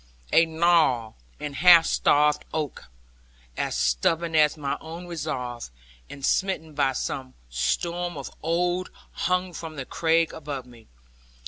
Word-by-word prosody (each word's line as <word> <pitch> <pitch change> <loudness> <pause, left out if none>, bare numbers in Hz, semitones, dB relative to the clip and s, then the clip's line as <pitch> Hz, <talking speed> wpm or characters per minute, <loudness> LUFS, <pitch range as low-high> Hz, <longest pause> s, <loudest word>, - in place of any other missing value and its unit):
A 165 - +6
gnarled 160 -9 +2 0.3
and 145 -2 -5
half 175 -1 +8
starved 150 0 +3
oak, 150 -3 -4 0.7
as - - -2
stubborn 165 - +1
as 150 0 +4
my 140 -2 -2
own 165 +2 -8
resolve, 135 - -5 0.4
and 140 -1 -6
smitten 185 -5 0
by 140 -2 +1
some 130 0 -4 0.2
storm 170 - -1
of 140 - -7
old, 175 +3 0 0.2
hung 180 0 -1
from 160 -1 -7
the 135 -2 -5
crag 165 +2 +1
above 145 -4 -6
me. 120 -2 -17
155 Hz, 130 wpm, -25 LUFS, 135-170 Hz, 0.7 s, half